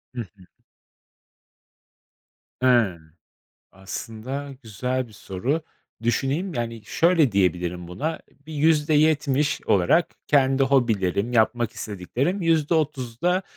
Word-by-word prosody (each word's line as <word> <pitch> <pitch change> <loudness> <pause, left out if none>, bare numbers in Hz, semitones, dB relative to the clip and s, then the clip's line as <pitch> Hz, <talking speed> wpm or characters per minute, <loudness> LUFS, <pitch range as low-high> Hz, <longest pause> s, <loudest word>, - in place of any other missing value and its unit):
Hı 120 - -2
hı. 100 -3 -13 2.1
Hıı. 120 -9 +3 0.7
Aslında 115 +8 -6
güzel 125 +4 -3
bir 110 - -17
soru. 105 - -2 0.4
Düşüneyim. 140 +10 0
Yani, 115 -2 -4
şöyle 165 - +3
diyebilirim 90 -2 0
buna, 155 - -3 0.3
bir 160 - -8
%70 150 -2 +2
olarak 100 - +3
kendi 135 -1 +3
hobilerim, 115 -5 +1
yapmak 120 0 +2
istediklerim, 120 - -3
%30'da 155 0 +1
130 Hz, 90 wpm, -24 LUFS, 105-150 Hz, 2.1 s, Hıı